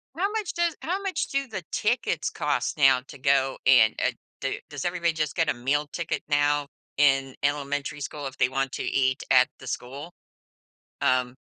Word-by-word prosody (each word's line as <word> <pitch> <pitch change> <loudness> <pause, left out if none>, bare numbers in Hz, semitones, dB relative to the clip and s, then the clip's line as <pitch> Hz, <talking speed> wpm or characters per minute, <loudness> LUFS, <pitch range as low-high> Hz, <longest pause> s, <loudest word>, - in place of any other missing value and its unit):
How 390 +5 0
much 430 -4 -2
does 340 -2 0
how 370 +5 -2
much 385 -5 -2
do 275 0 -1
the 215 -6 -6
tickets 235 +4 0
cost - - -1
now 135 -3 +5
to 135 - -13
go 135 0 +2
in, 115 -4 +7
u - - -26 0.2
h, - - -24 0.2
do 135 - -2
does 145 +1 -6
everybody 175 -1 +1
just 155 -2 -2
get 165 -2 +2
a - - +2
meal 140 +4 0
ticket 170 +2 -3
now 145 0 +2 0.3
in 135 -2 +3
elementary 145 0 -1
school 145 +1 -5
if 135 - -9
they 125 - +4
want 135 0 -1
to - - -3
eat 130 -1 +1
at 130 -1 +6
the 130 - -11
school, 135 +7 -6 0.9
um 125 0 +1
145 Hz, 190 wpm, -26 LUFS, 135-170 Hz, 0.9 s, in